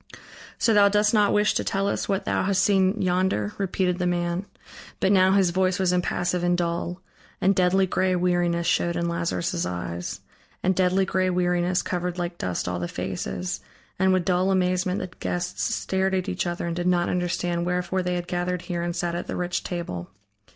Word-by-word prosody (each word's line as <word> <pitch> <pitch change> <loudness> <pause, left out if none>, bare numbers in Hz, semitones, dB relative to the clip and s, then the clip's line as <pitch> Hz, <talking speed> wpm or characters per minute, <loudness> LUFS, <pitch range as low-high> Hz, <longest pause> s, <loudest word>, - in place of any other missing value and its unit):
"So 225 - +3
thou 205 -1 +6
dost 210 +1 +2
not 210 -2 +4
wish 210 0 +3
to - - 0
tell 195 0 0
us 200 - -2
what 195 -1 0
thou - - +1
hast 195 0 +2
seen 195 +1 +3
yonder?" 180 - +1
repeated 185 -2 0
the 180 - +1
man. 175 +2 -1 0.5
But 190 - +2
now 190 -1 +5
his 190 -3 +3
voice 185 0 +1
was 185 -2 +2
impassive 180 0 0
and 175 0 +2
dull, 175 +1 -2 0.4
and 195 +2 +3
deadly 185 +1 +3
gray 185 0 +1
weariness 175 -1 +1
showed 170 0 +1
in 170 0 -1
Lazarus' 170 +1 -1
eyes. 90 -1 -4 0.4
And 185 0 +2
deadly 185 +1 +2
gray 185 0 +1
weariness 180 0 +1
covered 180 0 -2
like 175 0 -4
dust 90 -1 -2
all 90 0 -2
the 90 - -2
faces, 95 - -4 0.4
and 190 0 +4
with 185 -2 +2
dull 185 +1 +2
amazement 185 0 +1
the 185 -1 -6
guests 175 0 -3
stared 190 0 0
at 185 +1 -1
each 185 -1 -2
other 175 0 -3
and 170 -1 -2
did 175 +1 -1
not 175 -1 +2
understand 175 -1 -1
wherefore 180 +1 0
they 180 0 -1
had 175 0 -3
gathered 180 0 -2
here 175 -2 -3
and 175 0 -2
sat 175 -1 -1
at 175 - -4
the - - -3
rich 180 0 -2
table. 170 - -5
180 Hz, 195 wpm, -25 LUFS, 175-185 Hz, 0.5 s, thou